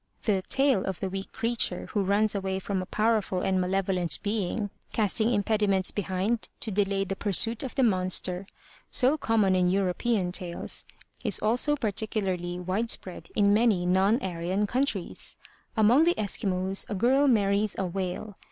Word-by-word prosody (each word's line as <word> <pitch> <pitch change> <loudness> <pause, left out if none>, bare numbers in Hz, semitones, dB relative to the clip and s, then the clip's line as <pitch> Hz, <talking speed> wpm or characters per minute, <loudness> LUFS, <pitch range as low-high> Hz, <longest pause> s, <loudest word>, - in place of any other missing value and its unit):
The 200 -4 +1
tale 270 -8 +3
of 190 -2 -4
the 190 -2 -3
weak 195 0 -6
creature 235 0 -1
who 205 - 0
runs 200 +2 +2
away 190 -1 -2
from 190 0 -3
a 185 - -7
powerful 215 -4 0
and 190 -1 +1
malevolent 185 -1 0
being, 205 0 -2 0.2
casting 220 +2 +1
impediments 205 -3 +1
behind 205 +3 -2
to 230 -6 -4
delay 195 0 0
the 195 0 -4
pursuit 215 +3 +2
of 265 - -6
the 270 - +2
monster, 185 -2 +1 0.4
so 260 +3 +4
common 220 -9 +1
in 180 -1 +2
European 190 +1 0
tales, 180 -2 -3 0.4
is 215 -5 +4
also 245 +7 +2
particularly 195 -7 -2
wide 190 +6 -2
spread 185 -4 -2
in 205 -2 +4
many 210 -5 +2
non 190 +6 +3
Aryan 185 +3 -1
countries. 235 -5 -2 0.4
Among 230 +8 +5
the 345 - +3
Eskimos 195 -2 +1
a 205 - -2
girl 260 +8 +3
marries 205 -3 +2
a 190 - -1
whale. 190 +2 -5
200 Hz, 155 wpm, -27 LUFS, 185-220 Hz, 0.4 s, Among